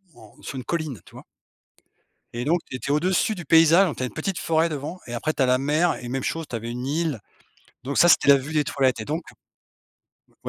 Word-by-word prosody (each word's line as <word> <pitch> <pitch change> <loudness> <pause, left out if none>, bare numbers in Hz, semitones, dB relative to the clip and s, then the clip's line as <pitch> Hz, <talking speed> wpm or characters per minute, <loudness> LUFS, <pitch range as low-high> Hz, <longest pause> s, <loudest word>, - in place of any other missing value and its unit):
en 110 -2 -18
sur - - -7
une 130 - -5
colline, 155 - -3
tu - - -18
vois? - - -11 1.1
Et 120 +1 -4
donc, 170 +4 +2
tu - - -5
étais 135 +2 -4
au-dessus 185 - +1
du 175 -3 -8
paysage, 165 +3 +5
tu 130 - -4
as - - +1
une 125 - -7
petite 170 +1 -3
forêt 165 +1 +1
devant 155 +4 -6
et 120 - -7
après 155 +6 -2
tu - - -3
as - - +4
la 125 0 +3
mer 150 +6 +1
et 120 - -7
même 130 +1 -3
chose, 165 0 -3
tu - - -5
avais 115 +1 -5
une 125 +1 -5
île. 150 -2 -1 0.6
Donc 140 +2 -3
ça, 175 - +6
c'était - - +4
la 140 - +8
vue 140 +4 -7
des 150 - +2
toilettes. 130 -3 0
Et 110 - -5
donc, 155 +6 -3 1.1
ou - - -11
150 Hz, 240 wpm, -24 LUFS, 130-165 Hz, 1.1 s, la